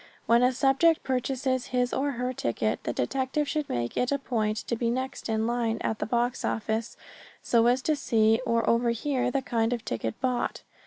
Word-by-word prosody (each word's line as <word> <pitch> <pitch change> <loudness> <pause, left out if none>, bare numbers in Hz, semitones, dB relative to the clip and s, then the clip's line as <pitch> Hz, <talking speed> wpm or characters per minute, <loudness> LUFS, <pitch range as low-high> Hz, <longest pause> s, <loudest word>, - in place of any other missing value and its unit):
When 235 +1 +4
a 250 +1 +4
subject 275 +5 +3
purchases 260 0 -1
his 250 -1 0
or 280 +1 0
her 250 +1 -2
ticket 115 - -2
the - - 0
detective 265 - -1
should 300 0 -2
make 120 -1 -2
it 250 - 0
a 280 - +2
point 220 -5 -1
to 235 - -1
be 235 0 -1
next 260 0 -3
in 220 0 +1
line 235 -1 0
at 220 - -2
the - - -2
box 240 +2 0
office 220 +1 -2 0.5
so 235 -1 +3
as 250 +2 +2
to 310 - +2
see 225 -4 +2
or 230 -3 +1
overhear 240 +3 +1
the 270 +1 -1
kind 230 -1 0
of 235 - -4
ticket 115 -1 -3
bought. 250 -1 -1
245 Hz, 195 wpm, -27 LUFS, 225-260 Hz, 0.5 s, When